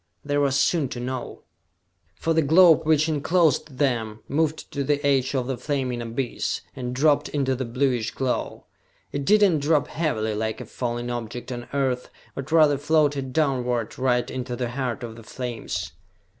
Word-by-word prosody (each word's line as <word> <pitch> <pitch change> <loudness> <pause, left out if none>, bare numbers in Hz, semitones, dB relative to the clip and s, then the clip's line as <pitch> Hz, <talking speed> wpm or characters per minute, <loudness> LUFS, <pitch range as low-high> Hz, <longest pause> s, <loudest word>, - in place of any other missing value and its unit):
They 145 0 -1
were 140 -1 +3
soon 135 +2 +2
to 120 - -5
know! 125 0 -5 0.7
For 165 - 0
the 160 - +3
globe 160 +1 +6
which 155 0 +4
enclosed 155 -2 +1
them, 115 -6 0
moved 155 +1 -1
to 140 - -2
the 145 +1 0
edge 135 -1 +2
of 130 -2 0
the 130 0 -3
flaming 130 -3 -2
abyss, 120 +2 -2
and 125 -1 -4
dropped 145 +2 +3
into 135 -2 0
the 130 0 -3
bluish 120 -2 0
glow! 130 0 -3 0.5
It 140 -1 -3
did 210 +4 +5
not 175 -6 +4
drop 150 +1 +2
heavily, 110 -10 -1
like 110 +1 -2
a - - -6
falling 120 0 -3
object 120 +1 -5
on 120 -1 -6
Earth, 130 -3 -1 0.2
but 135 +2 -7
rather 155 -4 +5
floated 145 -3 +1
downward, 125 -6 0
right 125 -1 +2
into 125 -1 -4
the 120 -1 -3
heart 125 -2 -3
of 115 -1 -6
the 115 - -11
flames. 120 +1 -5
135 Hz, 170 wpm, -24 LUFS, 120-145 Hz, 0.7 s, globe